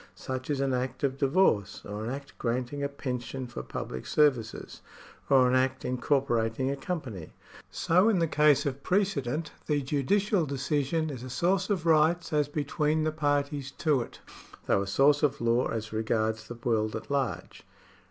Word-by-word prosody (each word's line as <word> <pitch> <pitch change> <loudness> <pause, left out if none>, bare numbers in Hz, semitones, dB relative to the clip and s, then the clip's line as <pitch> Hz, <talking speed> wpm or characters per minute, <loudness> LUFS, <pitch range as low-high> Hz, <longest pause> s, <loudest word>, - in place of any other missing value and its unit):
Such 130 +1 -5
is 140 -2 0
an 135 -1 +1
act 130 +3 -3
of 135 -1 0
divorce, 135 - +2
or 105 +1 -5
an 115 - -3
act 140 +2 -7
granting 125 +3 -2
a 140 - -1
pension 130 -1 -4
for 120 - -6
public 65 0 -6
services, 130 -8 +1 0.5
or 130 -2 +6
an 125 - +1
act 130 0 +1
incor 130 +2 +1
porating 120 +1 0
a - - -1
company. 135 - -5 0.4
So 180 +6 +3
in 215 - +3
the 170 - +3
case 150 -2 +3
of 140 -1 -3
precedent, 160 -7 0 0.2
the 145 -2 +1
judicial 170 - +1
decision 145 +3 -1
is 130 -4 -7
a 130 - -7
source 185 - +1
of 185 -5 -1
rights 165 +2 +3
as 150 -1 +2
between 150 +1 0
the 155 - +1
parties 145 -2 -1
to 150 -6 +2
it, - - -9 0.4
though 100 - +2
a 100 - -3
source 140 +8 +4
of 150 -3 +1
law 120 +1 +2
as 110 -1 -4
regards 110 0 -1
the 120 - -7
world 115 -2 0
at 110 +5 -7
large. 135 -4 -2
140 Hz, 175 wpm, -28 LUFS, 120-150 Hz, 0.5 s, or